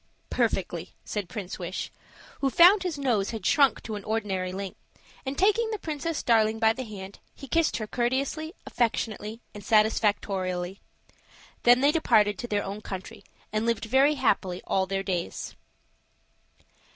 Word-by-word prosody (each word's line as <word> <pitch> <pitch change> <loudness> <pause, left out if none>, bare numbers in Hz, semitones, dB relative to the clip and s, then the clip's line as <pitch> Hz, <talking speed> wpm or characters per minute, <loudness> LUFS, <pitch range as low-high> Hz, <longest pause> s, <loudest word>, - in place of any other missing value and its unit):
"Perfectly," 185 -7 -1
said 205 -4 -4
Prince 190 0 -6
Wish, 180 +1 -4 0.5
who 275 - +2
found 360 +8 +7
his 360 -5 -2
nose 235 -8 +1
had 220 -5 -5
shrunk 275 +5 +4
to 220 - -5
an 205 -1 -5
ordinary 195 -4 -2
length. 195 0 -6 0.5
And 270 +1 -3
taking 425 +4 +3
the 435 - -2
Princess 320 -2 -3
Darling 220 -2 +3
by 220 0 +4
the 255 +2 -5
hand, 195 -2 -9 0.2
he 275 - -10
kissed 330 +5 +2
her 220 - -3
courteously, 270 - -1
affectionately, 225 -1 -2
and 205 -1 -9
satisfactorily. 195 -4 +1 0.8
Then 245 +1 +6
they 285 +2 +5
departed 215 -10 +3
to 240 - -4
their 205 -2 0
own 200 +2 -5
country, 190 -3 -7 0.3
and 215 0 +1
lived 230 -1 0
very 270 +6 +4
happily 195 -8 0
all 190 -1 +1
their 195 0 -2
days. 180 -3 -3
220 Hz, 150 wpm, -27 LUFS, 195-265 Hz, 0.8 s, found